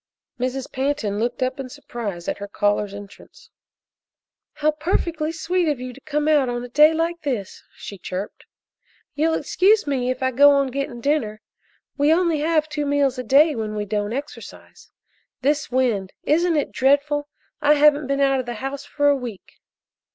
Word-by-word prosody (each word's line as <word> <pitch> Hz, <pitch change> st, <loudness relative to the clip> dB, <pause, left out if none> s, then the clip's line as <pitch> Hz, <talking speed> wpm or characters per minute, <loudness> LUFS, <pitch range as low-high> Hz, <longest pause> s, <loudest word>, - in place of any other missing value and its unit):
Mrs. 255 Hz, +1 st, -3 dB
Pantin 260 Hz, -7 st, -1 dB
looked 245 Hz, +3 st, -1 dB
up 255 Hz, +1 st, -2 dB
in 265 Hz, -1 st, -5 dB
surprise 230 Hz, -10 st, -6 dB
at -, -, -3 dB
her 205 Hz, -, -6 dB
caller's 205 Hz, 0 st, 0 dB
entrance. 205 Hz, 0 st, -13 dB, 1.0 s
"How 305 Hz, +1 st, +1 dB
perfectly 315 Hz, 0 st, -1 dB
sweet 345 Hz, +2 st, -1 dB
of 290 Hz, -4 st, -1 dB
you 250 Hz, 0 st, -6 dB
to 275 Hz, -, -15 dB
come 300 Hz, 0 st, -2 dB
out 290 Hz, -5 st, +3 dB
a 240 Hz, 0 st, -4 dB
day 300 Hz, +5 st, +6 dB
like 330 Hz, +1 st, -1 dB
this!" 245 Hz, -10 st, -4 dB
she 200 Hz, -, -9 dB
chirped. 185 Hz, +3 st, -6 dB, 0.7 s
"You'll 320 Hz, +3 st, +1 dB
excuse 410 Hz, +4 st, +2 dB
me 260 Hz, -4 st, -1 dB
if 255 Hz, +1 st, -2 dB
I 260 Hz, -, +2 dB
go 285 Hz, +3 st, +7 dB
on 275 Hz, -1 st, +2 dB
getting 260 Hz, -3 st, -4 dB
dinner? 230 Hz, -7 st, 0 dB, 0.6 s
We 290 Hz, +2 st, +4 dB
only 335 Hz, -2 st, +2 dB
have 310 Hz, 0 st, +1 dB
two 295 Hz, -1 st, -3 dB
meals 280 Hz, -2 st, +1 dB
a -, -, -3 dB
day 290 Hz, +6 st, +5 dB
when 215 Hz, -3 st, -4 dB
we 210 Hz, -1 st, -2 dB
don't 205 Hz, 0 st, -2 dB
exercise. 280 Hz, +5 st, -8 dB, 0.5 s
This 295 Hz, +2 st, +1 dB
wind 240 Hz, -7 st, 0 dB
isn't 335 Hz, +2 st, +2 dB
it 290 Hz, -, -1 dB
dreadful? 285 Hz, +2 st, +1 dB, 0.3 s
I 295 Hz, 0 st, +5 dB
haven't 295 Hz, -1 st, +4 dB
been 275 Hz, 0 st, 0 dB
out 270 Hz, -1 st, +3 dB
of 255 Hz, -, -4 dB
the 240 Hz, -, -4 dB
house 270 Hz, +4 st, -5 dB
for 290 Hz, 0 st, 0 dB
a 285 Hz, -, +5 dB
week." 240 Hz, -7 st, -8 dB
275 Hz, 175 wpm, -22 LUFS, 240-300 Hz, 1.0 s, go